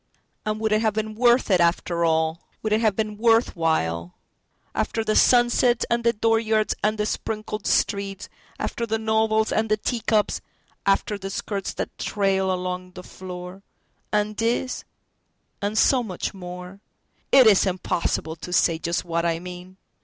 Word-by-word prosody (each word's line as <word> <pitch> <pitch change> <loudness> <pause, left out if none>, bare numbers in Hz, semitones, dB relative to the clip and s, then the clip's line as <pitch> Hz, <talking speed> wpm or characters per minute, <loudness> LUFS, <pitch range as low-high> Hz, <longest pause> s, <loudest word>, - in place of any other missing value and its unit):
And 215 0 -1
would 220 0 0
it 215 0 +3
have 220 -2 +1
been 220 0 -2
worth 240 0 +3
it, 180 -2 +4
after 170 0 +1
all, 160 0 +1 0.2
Would 215 -1 0
it 215 - +2
have 215 -3 +2
been 215 -1 -2
worth 230 0 +3
while, 90 - -1 0.6
After 225 - -1
the 215 -1 0
sunsets 240 0 +4
and 235 0 +1
the 235 - +4
dooryards 225 -1 +1
and 215 +1 +1
the 210 - 0
sprinkled 215 0 -4
streets, 200 -1 0 0.3
After 235 - -3
the 220 0 0
novels, 220 0 +1
after 220 0 +1
the 215 0 +2
teacups, 215 -1 0 0.5
after 200 +1 +1
the 195 0 -5
skirts 195 0 -4
that - - -4
trail 195 -2 +1
along 180 0 -4
the 180 - -9
floor—And 190 +3 -6
this, 240 +3 -1 0.8
and 205 +2 -2
so 255 +2 +4
much 190 -7 -4
more?—It 185 +7 -1
is 205 -2 +5
impossible 170 -3 -2
to 170 +3 -8
say 165 -2 +2
just 170 +1 -2
what 170 -1 -1
I 165 -1 +1
mean! 180 +1 -10
210 Hz, 155 wpm, -24 LUFS, 180-220 Hz, 0.8 s, is